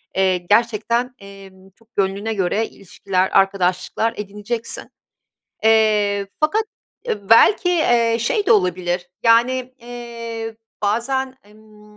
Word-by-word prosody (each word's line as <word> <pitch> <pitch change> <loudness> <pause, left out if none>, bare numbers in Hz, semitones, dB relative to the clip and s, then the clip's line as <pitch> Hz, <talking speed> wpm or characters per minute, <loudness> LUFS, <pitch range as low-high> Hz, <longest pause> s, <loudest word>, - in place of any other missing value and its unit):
eee, 190 -1 +2
gerçekten, 230 +5 0
eee, 195 -1 -12 0.2
çok 230 0 -29
gönlüne 200 +3 -1
göre 205 +2 0
ilişkiler, 190 0 -2
arkadaşlıklar 195 +3 0
edineceksin. 210 +3 -6 0.8
Eee, 210 -2 +3
fakat, 365 +9 +2 0.4
eee, 200 -2 -4
belki, 360 - +6
eee, 240 -9 +2
şey 405 - 0
de - - +5
olabilir, 180 -2 0
yani, 250 +2 +2
eee, 230 -2 -7 0.3
bazen, 260 +5 -1
emm, 210 0 -20
220 Hz, 105 wpm, -20 LUFS, 195-235 Hz, 0.8 s, belki